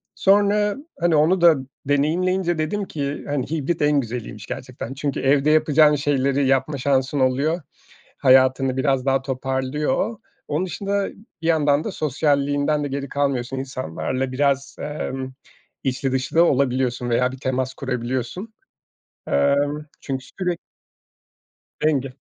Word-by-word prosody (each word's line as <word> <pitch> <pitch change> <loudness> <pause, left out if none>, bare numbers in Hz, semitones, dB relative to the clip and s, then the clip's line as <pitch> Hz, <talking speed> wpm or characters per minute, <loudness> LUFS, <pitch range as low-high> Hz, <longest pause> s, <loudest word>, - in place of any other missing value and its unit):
Sonra 205 +1 +3 0.2
hani 170 -1 +3
onu 165 +5 +3
da 170 -2 +7 0.3
deneyimleyince 175 +5 +1
dedim 180 +7 -1
ki 145 -4 -4
hani 145 -1 -2
hibrit 160 +1 -1
en 145 -1 +3
güzeliymiş 115 -4 -5
gerçekten. 125 0 -6
Çünkü 140 0 -3
evde 140 +2 +3
yapacağın 155 -1 +5
şeyleri 140 -1 +1
yapma 135 +2 +1
şansın 135 +1 +1
oluyor. 140 +6 +1 0.6
Hayatını 130 0 +4
biraz 135 -1 +1
daha 135 -1 +2
toparlıyor. 135 - -1 0.3
Onun 155 +5 -1
dışında 200 +2 -2 0.3
bir 165 - -2
yandan 150 -2 +3
da - - -3
sosyalliğinden 145 0 +1
de - - -1
geri 140 0 -4
kalmıyorsun. 135 -2 -1
İnsanlarla 130 0 -3
biraz, 140 0 0
emm, 135 -3 -4 0.5
içli 135 0 -1
dışlı 130 +4 -2
da 170 - +8
olabiliyorsun 130 -4 +1
veya 125 +2 +2
bir 130 - -8
temas 130 0 -2
kurabiliyorsun. 130 - -4 0.8
Emm, 145 +2 +1
çünkü 130 -2 -4 0.2
sürek 180 -2 -1 1.2
Denge. 135 -4 0
140 Hz, 125 wpm, -22 LUFS, 130-155 Hz, 1.2 s, da